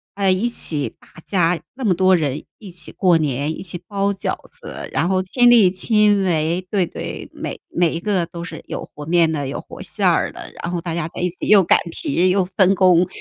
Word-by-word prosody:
呃， 195 -2 +2
一 190 +6 +1
起 150 -10 -2
大 - - -21 0.2
家 175 -3 +1 0.2
那 265 - -7
么 195 -5 +3
多 185 +1 +4
人 150 -3 -2 0.2
一 200 -5 -10
起 175 - -9
过 180 -4 +3
年、 145 0 -1
一 - - -7
起 175 -2 -5
包 200 0 0
饺 195 - -2
子， 485 -1 -9
然 175 - +1
后 185 -1 +2
亲 245 +6 +3
力 215 -7 +6
亲 210 +1 +3
为 170 +1 0
对， 195 -4 +1
对， - - -7
每 - - -6
每 170 -2 +1
一 165 - -3
个 190 -2 0
都 170 -1 -8
是 180 - -8
有 - - -5
和 150 0 -8
面 170 -1 +3
的、 145 -3 -2
有 135 - -4
和 - - -12
馅 - - -1
儿 - - +2
的， - - -10
然 175 - -4
后 175 - -2
大 165 -1 -4
家 165 -2 -2
在 - - -8
一 180 - +1
起 175 - -6
又 205 -2 +7
擀 170 - +4
皮、 185 - +1
又 185 0 +2
分 190 +1 +2
工， 180 -1 +4
180 Hz, 245 characters per minute, -20 LUFS, 170-195 Hz, 0.2 s, 又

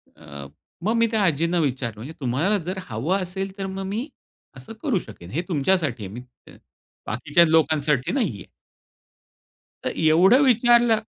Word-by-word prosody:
अ, 70 -1 -10 0.4
मग 215 +4 +1
मी 230 0 +3
त्या 220 -2 +1
आजींना 170 +1 +1
विचारलं 130 -6 -2
म्हणजे 140 +8 -8
"तुम्हाला 150 - 0
जर 185 +3 -4
हवं 135 - -1
असेल 190 +2 -5
तर 195 - -4
मग 190 0 -5
मी 220 +8 -3 0.5
असं 130 - -10
करू 250 - +1
शकेन, 95 - -12
हे 160 +7 -1
तुमच्यासाठी 155 - 0
आहे, 95 - -9
मी 120 - -7 0.9
बाकीच्या 145 +9 +3
लोकांसाठी 150 -4 +2
नाहीये." 175 - -2 1.4
तर - - -1
एवढं 175 - +5
विचारलं 240 -3 +4
170 Hz, 145 wpm, -23 LUFS, 130-200 Hz, 1.4 s, एवढं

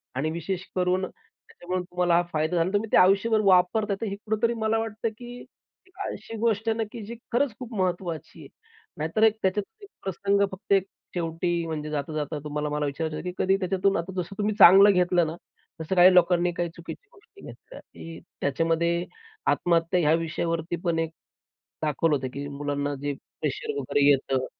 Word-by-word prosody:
आणि 155 +5 -1
विशेष 175 +3 -4
करून 185 +1 +1
त्याच्यामुळे 180 0 -7
तुम्हाला 180 -1 +1
हा 175 - +4
फायदा 155 +3 0
झाला 170 - +3
आणि 185 +4 -1
तुम्ही 210 +1 -1
ते - - +5
आयुष्यभर 200 +4 +4
वापरता 200 +3 +3
आहे, - - -3
तर 225 - -1
हे - - -3
कुठेतरी 220 +3 -1
मला 220 +1 +1
वाटतं, 225 0 -3
की 245 +2 -11 0.6
अशी 225 - -8
गोष्ट 225 0 0
आहे 220 - 0
ना, 225 - 0
की 235 - -7
जी 235 - -7 0.2
खरंच 265 -1 +2
खूप 245 -2 -8
महत्त्वाची 175 -3 -3
आहे. - - -11 0.5
नाहीतर 160 +8 0
एक 220 0 +5
त्याच्यात 190 +2 +1 0.2
एक 400 - -12
प्रसंग 200 +1 0
फक्त 190 +1 -2 0.4
शेवटी 170 0 -1
म्हणजे 155 -1 -4
जाता 150 0 -3
जाता 150 0 -3
तुम्हाला 150 0 -3
मला 150 0 -1
विचारायचं 155 +2 -3
होत, - - -6
की 180 - -3
कधी 190 +1 +3
त्याच्यातून 190 +1 +1
आता 170 +3 -4
जसं 185 +3 -9
तुम्ही 210 +1 0
चांगलं 195 +3 +9
घेतलं 180 -2 +2
ना 160 - -5 0.5
तसं 175 +4 -2
काही 180 +1 +7
लोकांनी 175 0 +4 0.2
चुकीच्या 180 - -10
गोष्टी 410 -1 -20
घेतल्या, - - -12
की 165 0 -11 0.2
त्याच्यामध्ये 165 +4 +1 0.5
आत्महत्या 170 +1 +1
या 155 -1 +3
विषयावरती 165 0 -2
पण 170 -2 0
एक 165 -1 -1 0.7
दाखवलं 150 +1 +1
होतं, 135 -2 -3
की 140 +1 -5
मुलांना 145 0 -3
जे 145 0 -2
प्रेशर 445 - -5
वगैरे 140 -1 +1
येतं. 135 -1 +2
180 Hz, 180 wpm, -26 LUFS, 160-205 Hz, 0.7 s, चांगलं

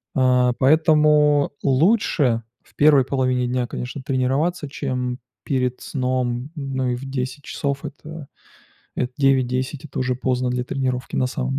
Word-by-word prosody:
А. 125 -1 +3
Поэтому 150 0 +4
лучше 140 - +2 0.2
в - - -27
первой 145 -2 +5
половине 130 -2 0
дня, 125 0 -1
конечно, 125 +3 -6
тренироваться, 140 +5 0
чем 125 -3 -3 0.2
перед 125 -2 -1
сном. 125 0 -2
Ну 135 -3 -2
и - - -1
в 125 +3 -7
10 130 +1 -4
часов, 140 +1 -3
это 150 +2 -9 0.7
эт 125 0 -2
9-10- 130 0 +1
это 135 - -7
уже 130 0 0
поздно 125 0 -1
для 125 0 -1
тренировки, 130 -2 -3
на 130 - +2
самом 130 +1 -2
130 Hz, 140 wpm, -22 LUFS, 125-145 Hz, 0.7 s, первой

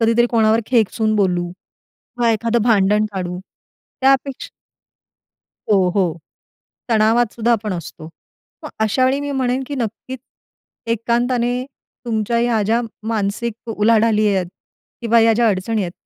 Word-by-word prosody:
कधीतरी 230 +1 +3
कोणावर 225 -1 +3
खेकसून 220 -2 +1
बोलू, 180 -3 0 0.7
का 235 -1 +3
एखादं 230 +1 0
भांडण 210 -2 +3
काढू. 180 -2 -4 0.6
त्यापेक्षा 270 0 +1 1.2
हो, 190 -2 +3
हो, 180 -5 0 0.7
तणावातसुद्धा 230 +1 +2
आपण 215 -3 -1
असतो. 160 -2 -8 0.5
मग - - -6
अशा 220 +4 +2
वेळी 265 +2 +1
मी 285 0 -4
म्हणेन, 260 -1 -1
की 285 - -5
नक्कीच 250 +2 -5 0.7
एकांताने 240 +2 0 0.4
तुमच्या 225 0 0
ह्या 235 -2 +1
ज्या 225 +4 +1 0.3
मानसिक 225 +2 -3
उलाढाली 215 0 +3
आहेत 185 -2 0 0.5
किंवा 230 -1 +3
या 225 0 +5
ज्या 235 0 +3
अडचणी 210 +2 -1
आहेत, 175 -2 -4
225 Hz, 125 wpm, -19 LUFS, 210-240 Hz, 1.2 s, या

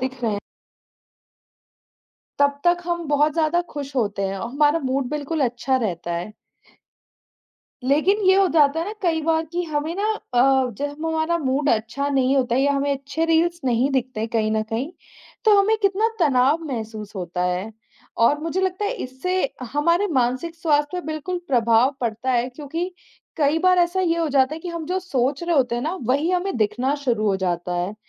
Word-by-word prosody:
दिख 260 -1 -4
रहे 215 -3 0 2.0
तब 285 0 +2
तक 350 0 +3
हम 345 -1 -2
बहुत 295 +1 +3
ज़्यादा 325 +2 +1
खुश 285 -1 -6
होते 205 -4 0
हैं 195 0 -3
और 230 - -4
हमारा 295 +4 +3
मूड 260 -1 -1
बिल्कुल 300 +1 -3
अच्छा 245 +2 0
रहता 175 -8 -2
है। 175 +5 -5 1.6
लेकिन 310 +9 +3
ये 380 - +7
हो 390 0 +5
जाता 295 -1 +4
है - - -1
ना 415 - -4
कई 330 -3 +1
बार 320 0 +1
कि 350 - -1
हमें 310 +1 -2
ना 400 - -1 0.3
अ, 260 +1 +4
जब 290 +2 -4
हमारा 320 +1 0
मूड 280 0 0
अच्छा 235 +6 -1
नहीं 270 -1 +2
होता 250 -2 +1
या 280 +2 +3
हमें 280 0 0
अच्छे 280 +4 -2
रील्स 340 +1 +2
नहीं 250 +2 +2
दिखते 255 -3 -1
हैं 225 - -2
कहीं 220 -2 +1
न 220 - +1
कहीं, 225 +7 -3 0.5
तो 420 -2 +6
हमें 430 +3 +3
कितना 400 +3 +2
तनाव 280 +2 +3
महसूस 220 -6 -6
होता 180 -1 -3
है। 180 +5 -2 0.5
और 260 +6 +4
मुझे 330 +4 -2
लगता 380 +2 -1
है 410 - 0
इससे 365 +9 -2 0.3
हमारे 335 +7 +2
मानसिक 255 +5 0
स्वास्थ्य 305 +1 +1
पे - - -13
बिल्कुल 315 +4 -3
प्रभाव 240 +1 +3
पड़ता 235 +2 -2
है 240 0 +1
क्योंकि 315 +7 -4 0.5
कई 305 0 +2
बार 365 +1 +4
ऐसा 350 +2 +2
ये 335 -2 +1
हो 330 -1 0
जाता 275 0 +2
है 320 - -8
कि 355 - -6
हम 335 -2 -5
जो 365 +3 -1
सोच 275 -4 -1
रहे 340 -1 0
होते 250 -4 +2
हैं 240 - -2
ना, 320 +6 -2
वही 280 +9 +1
हमें 365 +2 -1
दिखना 245 +5 0
शुरू 230 -4 +1
हो 195 -2 +2
जाता 180 -1 -2
है, 180 +4 -2
285 Hz, 190 wpm, -22 LUFS, 245-330 Hz, 2.0 s, ये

